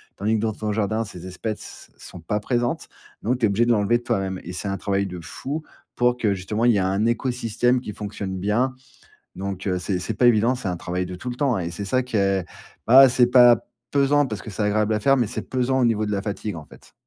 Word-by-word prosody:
Tandis 105 +3 0
que, - - -2
dans 110 -1 0
ton 105 0 -3
jardin, 110 +2 -1
ces 90 -3 -9
espèces 105 +4 -7
sont - - -11
pas 95 +6 -2
présentes 120 +2 -1 0.3
donc 125 +4 0
tu 120 - +2
es - - +3
obligé 115 +4 +2
de - - +3
l'enlever 110 +2 +2
de - - -18
toi-même 95 -4 -1
et 90 - -7
c'est 90 - -5
un 100 - -2
travail 100 +1 -1
de 90 -2 -6
fou, 135 - -5 0.3
pour 125 0 +2
que, 110 -4 +1
justement, 100 +4 -2
il 120 - +6
y 105 - +2
ait - - +2
un 95 +3 +1
écosystème 120 0 +1
qui 105 - -7
fonctionne 100 -2 -5
bien 110 +7 +1 0.6
donc, 95 0 -5
heu, 90 -1 0
c'est 90 +1 -2
c'est 105 - -3
pas 125 - +3
évident, 120 +1 +4
c'est 125 -6 -4
un 90 - -2
travail 90 +2 -3
de 90 - -7
tout 110 +8 -6
le 120 - -6
temps 130 -5 +1
et 85 -2 -3
c'est 90 +4 -6
ça 130 +6 +1
qui 125 -2 -4
est 100 -2 +1 0.4
bah, 130 +3 +9
c'est 125 0 +4
pas 120 -1 +6 0.3
pesant, 145 +1 +3
parce 110 -5 -6
que 110 - -8
c'est 105 +2 -3
agréable 105 +1 +1
à 105 - -1
faire, 135 +5 +4
mais 120 -3 +1
c'est - - -4
pesant, 130 +1 +1
au - - +3
niveau 110 -2 +2
de 105 - -2
la 100 - 0
fatigue, 105 -1 -4
en 75 - -8
fait. - - -18
110 Hz, 255 wpm, -23 LUFS, 100-120 Hz, 0.6 s, bah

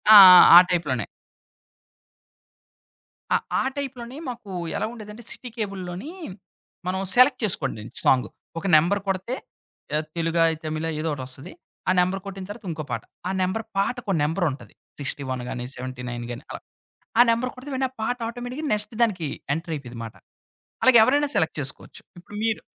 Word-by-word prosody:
ఆ! - - +13 0.2
ఆ! 170 - +10
ఆ - - +14
టైప్‌లోనే. 135 - 0 2.3
ఆహ్, - - 0 0.2
ఆ - - 0
టైప్‌లోనే. 260 -2 -5
మాకు 230 -5 -8 0.3
ఎలాగుండేదంటే, 220 0 -6
సిటీ 250 - -8
కేబుల్లోని 195 - -5 0.8
మనం 190 +1 -1
సెలెక్ట్ 255 +1 +5
చేసుకోండండి, 135 - -1
సాంగు 125 -4 +3 0.3
ఒక 195 - -10
నంబర్ 195 +6 +2
కొడితే 195 +6 -1 0.6
ఆహ్, 155 +1 0
తెలుగా? 165 0 +2 0.2
తమిళా? 155 +1 -3
ఏదోకటొస్తది. 135 -4 -5 0.4
ఆ - - +5
నంబర్ 185 +1 +1
కొట్టిన 195 -1 -7
తరువాత 210 0 -9
ఇంకో 155 -1 -5
పాట, - - -3 0.2
ఆ - - -1
నంబర్ 185 +5 -1
పాటకో 225 +1 -1
నంబరుంటది. 155 -2 -2 0.3
61 130 -2 -3
గాని, 120 -1 -4
79 125 -1 -6
గాని 120 +4 -7
అలా. - - -6 0.6
ఆ - - +10
నంబర్ 235 +2 0
కొడితే 265 +3 -10 0.2
ఆ - - -22
పాట 245 +3 -1
ఆటోమేటిక్‌గా, 245 +5 -5
నెక్స్ట్ 210 +2 -3
దానికి 185 -9 +1 0.3
ఎంటర్ 165 +2 -5
అయిపోయిందిమాట. 120 -5 -8 0.7
అలాగ 260 -2 +7
ఎవరైనా 285 +4 +2
సెలెక్ట్ 160 - +1
చేసుకోవచ్చు. 140 0 -3 0.2
ఇప్పుడు 195 +4 -11
మీరు 225 -1 0
185 Hz, 140 wpm, -24 LUFS, 145-230 Hz, 2.3 s, ఆ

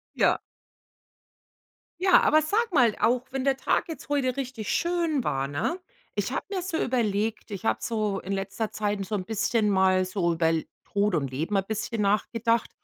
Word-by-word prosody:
Ja. - - +3 1.6
Ja, 375 0 +6
aber 310 +1 +4
sag 435 +7 0
mal, 240 -7 +5
auch 245 +1 +3
wenn 265 -1 -2
der 275 -1 +2
Tag 270 - 0
jetzt 325 - -8
heute 270 -3 +1
richtig 255 -5 -4
schön 335 -6 0
war, 135 0 -1
ne? 170 - -2 0.3
Ich - - -1
habe - - -2
mir 390 -2 -1
so 355 -2 -3
überlegt, 220 -5 -1
ich 200 0 -6
habe - - +2
so 215 -4 -1
in 195 - -5
letzter 195 +3 -2
Zeit 205 -2 -2
so 215 - -4
'n 190 -3 -1
bisschen 215 +1 +1
mal 190 -1 +3
so 185 -2 0
über 165 0 +1
L 165 -1 0 0.2
Tod 205 -1 0
und 140 -5 0
Leben 160 +10 -3
mal 195 - +3
bisschen 215 +2 -3
nachgedacht. 230 +3 +1
215 Hz, 180 wpm, -27 LUFS, 195-265 Hz, 1.6 s, Ja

